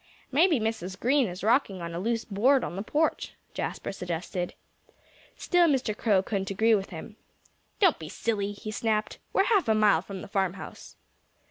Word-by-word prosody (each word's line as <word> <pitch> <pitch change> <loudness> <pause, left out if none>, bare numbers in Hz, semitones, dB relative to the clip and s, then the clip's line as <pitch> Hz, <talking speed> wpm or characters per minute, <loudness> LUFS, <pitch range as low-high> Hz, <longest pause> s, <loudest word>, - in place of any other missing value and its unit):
"Maybe 315 +1 +4
Mrs. 215 -4 -3
Green 265 0 +3
is 180 +1 -7
rocking 220 -4 +2
on 170 -1 -5
a 170 - -3
loose 230 +3 -1
board 245 +6 +3
on - - -4
the 195 - -3
porch," 300 +9 -1 0.2
Jasper - - -4
suggested. 180 0 -4 0.8
Still 355 -1 +3
Mr. 260 -7 +1
Crow 205 -4 +2
couldn't 195 -1 -2
agree 220 +4 +3
with 195 -2 +1
him. 190 +4 -9 0.6
"Don't 375 -7 +4
be 155 -1 -7
silly!" 205 -1 -1
he 215 +1 -7
snapped. 215 0 -1
"We're 390 - +3
half 405 - +2
a 220 - +4
mile 210 -6 +4
from 190 0 -8
the - - -8
farmhouse." 195 -1 -3
215 Hz, 170 wpm, -28 LUFS, 190-245 Hz, 0.8 s, Maybe